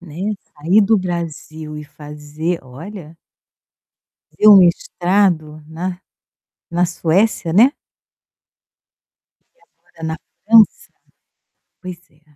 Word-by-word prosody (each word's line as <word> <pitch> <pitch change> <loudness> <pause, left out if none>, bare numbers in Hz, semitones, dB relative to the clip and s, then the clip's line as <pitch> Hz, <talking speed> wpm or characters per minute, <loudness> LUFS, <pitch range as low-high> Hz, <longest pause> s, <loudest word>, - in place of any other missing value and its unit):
Né, 180 +5 -5 0.2
sair 175 +8 +3
do 215 +2 +3
Brasil 160 -4 -5
e 150 - -7
fazer, 150 +3 -6
olha 165 +5 -11 1.1
fazer 215 - +3
um 205 - +10
mestrado 175 -3 +1
na 175 +3 -6 0.7
na 175 +1 +1
Suécia, 175 +1 0
né? 235 +9 +5 1.8
E - - -39
agora - - -26
na 160 - -3 0.3
França. 225 0 +4 0.9
Pois 180 -2 -9 0.2
é. - - -35
170 Hz, 95 wpm, -18 LUFS, 155-195 Hz, 1.8 s, um